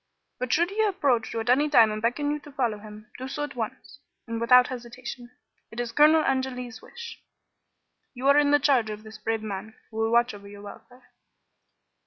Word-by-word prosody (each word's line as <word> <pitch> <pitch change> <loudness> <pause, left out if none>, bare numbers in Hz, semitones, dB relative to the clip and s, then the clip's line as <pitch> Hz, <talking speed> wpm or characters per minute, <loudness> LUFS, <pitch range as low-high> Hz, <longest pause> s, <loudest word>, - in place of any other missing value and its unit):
"But 255 -1 -3
should 345 +3 +2
he 430 +2 0
approach 285 - +1
you 225 - -2
at 225 - -4
any 290 +4 +3
time 230 -7 +6
and 215 0 -4
beckon 270 +6 0
you 300 - -2
to 295 - -14
follow 240 -6 -1
him, 215 +1 -12
do 260 - -5
so 295 +2 -4
at 295 - -6
once, 225 -3 -6 0.3
and 230 -1 -4
without 250 +1 +6
hesitation. 245 -1 -8 0.4
It 220 - -9
is 240 -1 -2
Colonel 305 +5 +5
Angeli's 255 -3 -2
wish. 470 0 -10 0.9
You 255 +2 -2
are 280 - +6
in 290 -1 +3
the 290 - +6
charge 260 -6 +2
of 210 0 -7
this 215 0 -11
brave 225 0 -2
man, 215 +1 -6 0.2
who 220 - -9
will 225 0 +1
watch 235 0 +3
over 200 -1 -11
your 205 0 -11
welfare." 245 +5 -13
245 Hz, 205 wpm, -26 LUFS, 220-280 Hz, 0.9 s, time